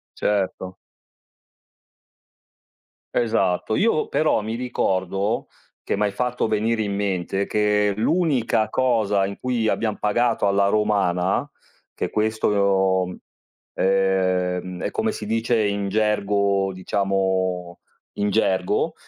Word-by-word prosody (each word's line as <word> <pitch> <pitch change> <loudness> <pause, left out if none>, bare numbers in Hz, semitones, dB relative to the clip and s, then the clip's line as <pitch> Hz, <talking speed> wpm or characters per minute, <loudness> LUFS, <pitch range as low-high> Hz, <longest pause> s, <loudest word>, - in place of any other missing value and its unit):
Certo. 95 -2 -1 2.4
Esatto. 110 -3 +1
Io 210 -8 +1
però 155 -7 +2
mi 110 +2 -4
ricordo, 95 -4 -1 0.4
che - - -1
m'hai 105 0 +1
fatto 125 +1 -1
venire 110 +1 0
in 100 -1 -2
mente, 95 -1 -1
che 105 -1 +1
l'unica 120 -5 +1
cosa 110 -6 +1
in 100 +1 -4
cui 120 -3 -1
abbiam 110 -1 0
pagato 105 0 +1
alla 100 0 +3
romana, 100 -4 +1 0.5
che - - -3
questo 110 +1 0
lo 95 -2 +2
mhmm, 90 - -7 0.6
ehm, 95 -2 0
è - - -1
come 220 0 -1
si 105 - -6
dice 115 +1 +1
in 100 -1 -1
gergo, 100 -2 +1
diciamo 95 -2 -1 0.4
in 105 0 -1
gergo, 95 -4 +1
100 Hz, 110 wpm, -23 LUFS, 95-110 Hz, 2.4 s, alla